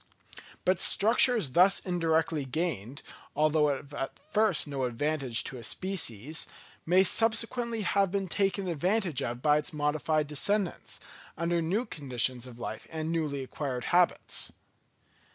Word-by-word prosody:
But 185 -1 +2
structures 225 - +4
thus 185 +6 +5
indirectly 165 -4 0
gained, 135 - -3 0.3
although 150 0 +3
at 140 -1 -4
first 210 -6 +4
of 145 - -10
no 135 -2 -1
advantage 130 0 -1
to 130 - -6
a - - -10
species, 155 - -2 0.4
may 185 +3 +5
subsequently 230 +2 +1
have 195 0 +2
been 195 0 -2
taken 195 +1 0
advantage 175 - 0
of 120 +1 -4
by 150 -1 +5
its 150 +3 -5
modified 150 +1 0
descendants, 180 +6 -1 0.4
under 170 +1 0
new 195 +9 0
conditions 130 - -2
of 120 -2 -12
life - - -6
and 160 0 -3
newly 150 -5 -2
acquired 130 -2 -4
habits. 175 0 +1
160 Hz, 135 wpm, -29 LUFS, 140-190 Hz, 0.4 s, thus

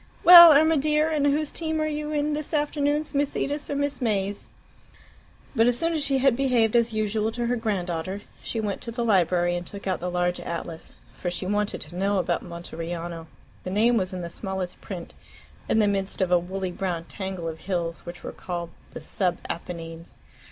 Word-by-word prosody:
Well, 345 -1 +12
Irma 315 +2 +5
dear, 300 +2 +2
and 295 -2 +2
whose 295 +1 +1
team 320 -1 -1
are 310 - +1
you 300 0 -3
in 300 0 0
this 305 +2 -3
afternoon 295 0 +1
Miss 285 0 0
Edith's 290 +1 -2
or 285 - -1
Miss 285 0 -2
May's?" 205 -3 -1 1.1
But 225 -1 +4
as 245 -1 +2
soon 330 +5 0
as 310 -3 0
she 275 -1 +1
had 265 -2 +3
behaved 245 -4 +2
as 235 -1 +3
usual 215 0 0
to 240 0 -2
her 245 +1 +1
grand 215 -6 -1
daughter, 180 +3 -4 0.2
she 225 - -3
went 205 -3 -2
to 230 - -5
the 235 0 -2
library 175 -4 +2
and 175 - -3
took 200 +3 -9
out 185 -2 -1
the 180 - -3
large 180 0 0
atlas, 165 -1 -6 0.2
for 175 - -4
she 175 +1 -4
wanted 205 +2 -1
to 165 +4 -6
know 195 +2 +1
about 185 - 0
Monteriano. 170 -1 -6 0.4
The - - -4
name 220 +5 +3
was 185 -4 0
in 185 -1 -5
the 170 - -5
smallest 190 -2 -5
print, 180 -4 -7 0.6
in - - +3
the 215 -2 +4
midst 195 -1 -1
of 185 -2 +1
a 180 - +5
woolly 185 +1 -4
brown 175 -2 -3
tangle 190 -1 -5
of 160 -1 -5
hills 170 -3 -2
which 175 0 -9
were - - -5
called 170 -2 -5 0.2
the - - -9
"Sub 180 -3 0
Apennines." 165 -1 -7
200 Hz, 205 wpm, -25 LUFS, 175-275 Hz, 1.1 s, Well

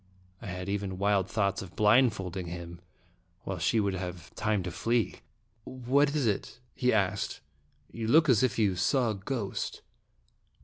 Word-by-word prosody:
I 115 - -8
had 90 0 -5
even 100 -2 -2
wild 100 -1 +1
thoughts 100 -3 0
of 95 -1 -10
blindfolding 105 -5 +2
him, 85 0 -7 0.6
while 95 -2 -4
she 90 +7 +1
should 100 -3 +1
have 90 -2 -6
time 105 -3 0
to 90 - -4
flee. 115 +6 0 0.5
"What 135 +5 +1
is 145 -4 +1
it?" 105 +3 -2
he 125 -1 +1
asked. 100 -2 0 0.3
" 70 0 -34
You 115 -1 -4
look 155 +6 +5
as 125 -6 +5
if 130 -4 +1
you 100 -4 +2
saw 120 +5 +2
a - - -3
ghost." 100 +1 -4
100 Hz, 165 wpm, -29 LUFS, 90-115 Hz, 0.6 s, look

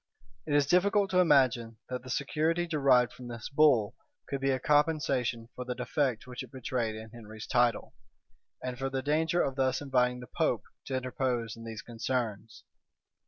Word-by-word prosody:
It 145 - +1
is 145 -1 +4
difficult 195 +5 +3
to 185 - +3
imagine 130 -9 +3
that 125 0 -3
the 130 - -11
security 160 +6 0
derived 135 -7 +3
from 125 -1 -10
this 120 -2 -6
bull 140 -8 +4 0.3
could 140 -1 -3
be 135 - +1
a 130 -1 +1
compensation 135 -6 +1
for 125 - -5
the 125 0 -4
defect 125 -1 -1
which 125 -1 -7
it 130 -3 -10
betrayed 125 -3 -2
in 110 0 -9
Henry's 110 -2 -9
title, 120 0 +1 0.7
and 125 -1 -4
for 135 0 -1
the 135 0 -3
danger 160 +4 +2
of 135 0 -3
thus 130 -1 +1
inviting 125 -3 +1
the 125 - -8
pope - - 0 0.2
to 135 - -3
interpose 125 -3 -2
in 115 0 -11
these 110 -1 -7
concerns. 115 -2 -3
130 Hz, 175 wpm, -30 LUFS, 120-145 Hz, 0.7 s, is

